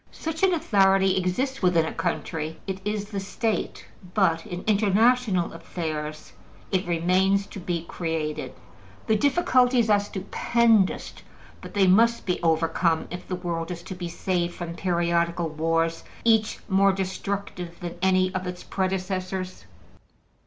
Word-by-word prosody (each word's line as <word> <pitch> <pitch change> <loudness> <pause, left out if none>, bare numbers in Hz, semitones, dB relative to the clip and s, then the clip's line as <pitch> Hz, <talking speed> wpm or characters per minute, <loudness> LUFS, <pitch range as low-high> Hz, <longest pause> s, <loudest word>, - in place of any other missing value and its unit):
Such 320 0 -5
an 385 -1 +5
authority 195 - +3
exists 250 +9 -1
within 180 -4 +3
a - - -4
country: 160 -1 -3
it 190 -1 -4
is 210 0 -3
the 200 -2 -3
State. 220 +3 -2 0.3
But 165 -6 +2
in 175 0 -6
international 215 -1 +2
affairs 155 -3 -5 0.4
it 185 -2 0
remains 185 +4 +2
to 200 - -9
be 170 -2 -3
created. 160 -3 -3 0.5
The 220 - +2
difficulties 250 -3 +3
are 205 - +5
stupendous, 205 +1 +1 0.5
but - - -10
they 200 -1 +4
must 230 +5 +4
be 180 - -1
overcome 165 0 +1
if 175 - -7
the 185 - -2
world 170 -2 -3
is 175 -1 -6
to 185 - -7
be 180 -1 -5
saved 175 0 -1
from 170 -1 -5
periodical 170 -1 0
wars, 165 +1 0 0.2
each 220 -1 +3
more 195 0 +4
destructive 190 -2 -4
than 175 0 -7
any 185 0 +3
of 185 0 -3
its 180 0 -6
predecessors. 185 -1 -3
185 Hz, 140 wpm, -25 LUFS, 170-205 Hz, 0.5 s, an